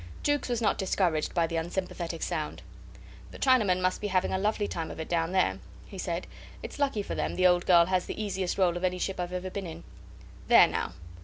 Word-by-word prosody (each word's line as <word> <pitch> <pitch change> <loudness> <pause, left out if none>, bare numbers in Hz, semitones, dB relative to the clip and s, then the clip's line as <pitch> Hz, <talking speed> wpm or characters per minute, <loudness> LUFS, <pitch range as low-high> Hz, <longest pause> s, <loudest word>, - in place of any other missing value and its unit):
Jukes 290 -2 0
was 240 -1 -1
not - - +2
discouraged 180 -5 0
by 170 -1 +3
the 165 0 -3
unsympathetic 170 0 -3
sound. 155 -4 -3 0.7
"The - - -11
Chinamen 215 -9 +3
must 185 0 0
be 210 - -1
having 185 -2 +1
a 190 - 0
lovely 210 +1 0
time 165 -1 -4
of - - -8
it 160 - -4
down 165 0 0
there," 140 - +1 0.3
he 195 - -10
said. 175 -1 -3 0.4
"It's - - -8
lucky 270 -8 0
for - - -5
them - - -2
the 185 - +2
old 175 -1 +4
girl 170 -2 +7
has 185 0 0
the - - -5
easiest 190 -4 -2
roll 180 -3 +2
of 175 - -6
any 180 0 +1
ship 190 +1 -3
I've 175 0 -3
ever 180 +1 -4
been 195 -2 -4
in. 160 - -9 0.6
There - - +8
now! - - -3
185 Hz, 225 wpm, -28 LUFS, 170-195 Hz, 0.7 s, There